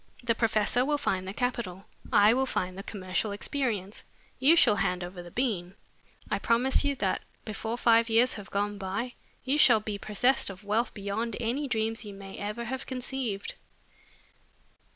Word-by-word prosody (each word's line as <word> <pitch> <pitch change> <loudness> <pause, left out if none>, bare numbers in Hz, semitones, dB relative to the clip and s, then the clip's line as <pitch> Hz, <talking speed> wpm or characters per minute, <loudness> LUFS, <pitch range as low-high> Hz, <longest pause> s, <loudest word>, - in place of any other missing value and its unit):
The 235 -1 +2
professor 225 +1 +2
will 295 +2 +1
find 190 -9 -1
the - - -3
capital, 215 -6 -2 0.3
I 210 +2 +6
will 265 +2 +1
find 185 -6 -2
the 195 - -6
commercial 195 0 -2
experience, 210 -3 -3 0.4
you 285 +6 +6
shall 240 -11 +5
hand 180 0 0
over 180 0 -7
the 175 - -10
bean. 195 -5 -2 0.6
I - - +1
promise 250 +5 +2
you 285 -1 +1
that 195 -7 0 0.2
before 220 +2 -3
five 230 -1 +4
years 235 +3 +4
have 205 -1 -8
gone 205 0 -1
by, 200 +6 -3 0.3
you 275 +3 +1
shall 240 -6 +7
be 210 -1 -5
possessed 245 +6 +2
of 195 +1 -9
wealth 215 +4 0
beyond 205 +2 -3
any 245 +5 -1
dreams 225 -2 -1
you 205 -2 -8
may 195 0 -9
ever 210 +3 -3
have 260 +3 -5
conceived." 255 -5 -3
220 Hz, 170 wpm, -29 LUFS, 200-245 Hz, 0.6 s, shall